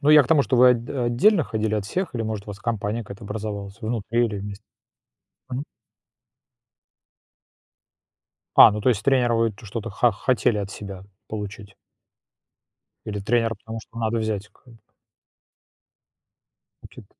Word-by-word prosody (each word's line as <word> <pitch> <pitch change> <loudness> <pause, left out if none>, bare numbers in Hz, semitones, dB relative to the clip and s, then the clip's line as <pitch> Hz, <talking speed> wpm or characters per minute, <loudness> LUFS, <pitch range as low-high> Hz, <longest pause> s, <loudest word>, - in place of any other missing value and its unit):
ну 145 +1 +3
я 150 -1 +9
к 125 - -6
тому, 150 -4 +5
что 130 - 0
вы 125 +1 +8
от 120 -1 0
отдельно 135 - +3
ходили 110 -1 -1
от 105 -2 -1
всех 180 - -3
или, 115 - -1
может, 110 -2 -4
у - - -6
вас 100 - -8
компания 115 -1 -2
какая-то 100 +1 -10
образовалась 105 0 -5
внутри 115 +1 0
или 105 -2 -4
вместе? 100 +1 -7 0.9
Мгм. 130 +3 -3 2.9
А, - - +11
ну 105 - -3
то 125 - +2
есть 110 -4 +2
тренера 125 -4 +3
вы 115 0 +2
т 110 +3 -14
что-то 115 +2 -5
хо 120 +4 +3
хотели 120 +1 +1
от 100 -1 -3
себя 100 -2 -8 0.2
получить. 105 -1 -7 1.3
Или 105 -1 -3
тренера, 115 +2 +1
потому 110 0 -8
что 110 - -18
надо 115 +1 0
взять 105 -2 -2
к - - -30 2.2
Букет. - - -13
110 Hz, 150 wpm, -24 LUFS, 105-120 Hz, 2.9 s, А